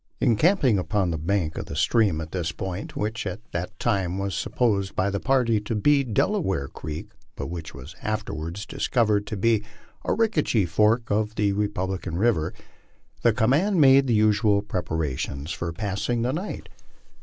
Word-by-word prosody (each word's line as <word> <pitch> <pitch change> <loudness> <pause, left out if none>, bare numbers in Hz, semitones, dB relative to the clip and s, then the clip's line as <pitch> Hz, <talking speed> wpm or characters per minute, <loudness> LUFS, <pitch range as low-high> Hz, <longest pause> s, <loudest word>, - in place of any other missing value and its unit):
Encamping 130 - +3
upon 95 -1 0
the 80 - -2
bank 85 -1 -1
of - - -6
the - - -6
stream 100 0 +2
at 80 0 -7
this 85 -3 -2
point 95 +2 -5
which 110 +2 -2
at 110 - -4
that 90 +1 -4
time 95 -6 0
was 100 -1 -2
supposed 100 +2 0
by 95 +2 +1
the 100 - -1
party 125 -4 +2
to 110 +2 -3
be 140 +6 +3
Delaware 115 - 0
creek, 75 +3 -7 0.2
but - - -5
which 80 -5 -7
was 70 +5 -10
afterwards 100 -3 -4
discovered 105 -5 +1
to 105 - -4
be 110 +1 +2 0.4
Arickaree 155 - +1
fork 110 +7 +2
of 105 +1 0
the 100 -1 +1
Republican 95 -3 -2
river 100 -7 +2 0.7
the 120 - +5
command 145 - +2
made 135 -1 +6
the 120 - +3
usual 105 -1 +3
preparations 80 - -3
for 85 +2 -3
passing 105 +6 -2
the 125 +2 0
night. 185 +7 -5
105 Hz, 160 wpm, -25 LUFS, 90-115 Hz, 0.7 s, made